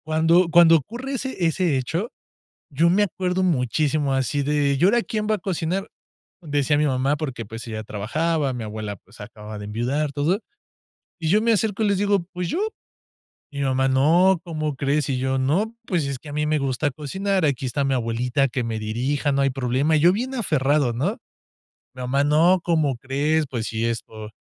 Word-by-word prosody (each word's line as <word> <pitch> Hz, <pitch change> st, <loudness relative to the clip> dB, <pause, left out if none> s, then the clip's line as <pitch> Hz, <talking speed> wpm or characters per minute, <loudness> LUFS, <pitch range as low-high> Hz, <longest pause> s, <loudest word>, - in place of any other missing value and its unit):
Cuando 165 Hz, +3 st, +3 dB
cuando 165 Hz, 0 st, +7 dB
ocurre 240 Hz, -, -6 dB
ese 260 Hz, -8 st, -2 dB
ese 165 Hz, -3 st, +1 dB
hecho, 165 Hz, -, -2 dB, 0.6 s
yo 160 Hz, +4 st, +2 dB
me 205 Hz, +3 st, +3 dB
acuerdo 185 Hz, -1 st, -1 dB
muchísimo 145 Hz, -2 st, +1 dB
así 135 Hz, +2 st, 0 dB
de: 145 Hz, -1 st, +1 dB
"¿Y -, -, +1 dB
ahora 225 Hz, +6 st, +4 dB
quién 215 Hz, -2 st, -3 dB
va 215 Hz, -, +2 dB
a -, -, -5 dB
cocinar?", 185 Hz, +1 st, -2 dB, 0.5 s
decía 145 Hz, -2 st, 0 dB
mi 150 Hz, -, +2 dB
mamá; 135 Hz, +1 st, +1 dB
porque, 135 Hz, -6 st, -5 dB
pues 115 Hz, +3 st, -9 dB
ella 110 Hz, -1 st, -5 dB
trabajaba, 145 Hz, +8 st, -1 dB
mi 120 Hz, -2 st, -5 dB
abuela, 105 Hz, -1 st, -5 dB
pues, -, -, -20 dB
acababa 105 Hz, 0 st, -9 dB
de 105 Hz, -, -7 dB
enviudar, 125 Hz, +8 st, -1 dB
todo, 155 Hz, +8 st, 0 dB, 0.8 s
y 165 Hz, -, -3 dB
yo 205 Hz, +7 st, +4 dB
me 230 Hz, +1 st, +2 dB
acerco 220 Hz, -1 st, +1 dB
y -, -, +2 dB
les 200 Hz, -1 st, +2 dB
digo: 200 Hz, -2 st, +1 dB
"Pues 180 Hz, -1 st, -3 dB
yo". 345 Hz, -, -1 dB, 0.9 s
Y 145 Hz, -, -9 dB
mi -, -, 0 dB
mamá: 130 Hz, 0 st, +1 dB
"No, 165 Hz, +8 st, +4 dB
¿cómo 155 Hz, -3 st, -3 dB
crees?". 140 Hz, +1 st, 0 dB
Y 130 Hz, -, 0 dB
yo: 130 Hz, +1 st, 0 dB
"No, 175 Hz, -, 0 dB
pues, 175 Hz, -8 st, 0 dB
es 140 Hz, -1 st, -3 dB
que 145 Hz, -, -12 dB
a -, -, -7 dB
mí 150 Hz, 0 st, 0 dB
me 155 Hz, 0 st, +1 dB
gusta 140 Hz, +2 st, -1 dB
cocinar, 190 Hz, +7 st, -2 dB
aquí 135 Hz, -3 st, -1 dB
está 130 Hz, +3 st, -1 dB
mi 135 Hz, 0 st, +1 dB
abuelita 125 Hz, +2 st, 0 dB
que 125 Hz, 0 st, -3 dB
me 115 Hz, -1 st, -3 dB
dirija, 130 Hz, +7 st, -1 dB
no 140 Hz, -, +1 dB
hay 135 Hz, -, +3 dB
problema", 135 Hz, +4 st, +1 dB
yo 170 Hz, +4 st, +5 dB
bien 250 Hz, +6 st, -3 dB
aferrado, 145 Hz, -, +1 dB
¿no? 165 Hz, -, -1 dB, 0.8 s
Mi 130 Hz, -, -7 dB
mamá: 135 Hz, +3 st, +1 dB
"No, 165 Hz, +5 st, +4 dB
¿cómo 155 Hz, -6 st, +1 dB
crees? 145 Hz, +5 st, 0 dB
Pues, 120 Hz, -4 st, -3 dB
si 110 Hz, 0 st, -2 dB
esto 110 Hz, -2 st, -4 dB
145 Hz, 195 wpm, -23 LUFS, 130-175 Hz, 0.9 s, cuando